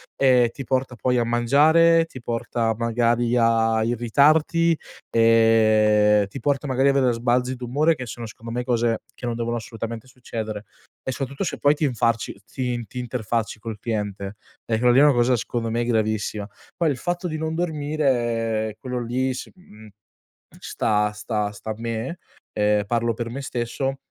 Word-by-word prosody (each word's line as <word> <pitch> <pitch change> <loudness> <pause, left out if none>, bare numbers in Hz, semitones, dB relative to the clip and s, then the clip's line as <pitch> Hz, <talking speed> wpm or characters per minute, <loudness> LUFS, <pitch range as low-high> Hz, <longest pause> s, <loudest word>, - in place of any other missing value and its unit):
ehm, 125 -3 +4
ti 135 - -8
porta 130 0 -1
poi 125 +2 0
a - - +2
mangiare, 155 +8 +4
ti 130 -6 -11
porta 115 -1 -1
magari 120 +1 +1
a 115 -1 +3
irritarti, 150 +8 +3 0.4
ehm, 110 -2 +4
ti 100 - -8
porta 140 0 0
magari 135 +1 +2
avere 135 -3 +3
sbalzi 125 +2 0
d'umore, 140 +7 +1
che 125 -2 -7
sono 120 +1 -6
secondo 115 +1 -9
me 125 +1 -2
cose 120 -2 0
che 125 - -7
non 120 - -2
devono 120 0 -2
assolutamente 115 0 -6
succedere, 110 -4 -6 0.4
e 130 - -2
soprattutto 135 +5 -4
se - - -3
poi 145 +1 +4
ti 155 - -4
infarci 115 -5 -1
ti 125 -2 -2
ti 125 - -11
interfacci 115 -3 -3
col 110 -1 -6
cliente, 105 -2 -4 0.3
e 110 -1 0
quello 125 +1 +4
lì 130 - +6
è - - +7
una 150 -1 +6
cosa 120 +1 +3
secondo 115 0 -3
me 120 +1 -1
gravissima. 110 -2 -1 0.3
Poi, 170 -3 +1
il 135 - -1
fatto 175 +5 -2
di 155 -2 -4
non 160 0 -3
dormire, 130 -9 0
ehm, - - -8
quello 125 -1 -4
lì, 130 +2 0
s - - -7
mhmm, 110 - -16 0.7
sta 105 -1 0
sta 105 -1 -2
sta 105 +1 -8
a - - -2
me, 115 +8 -4 0.3
ehm, 105 0 +2
parlo 115 +1 0
per 115 +1 -4
me 135 - -5
stesso 135 +1 -3
120 Hz, 170 wpm, -23 LUFS, 115-130 Hz, 0.7 s, è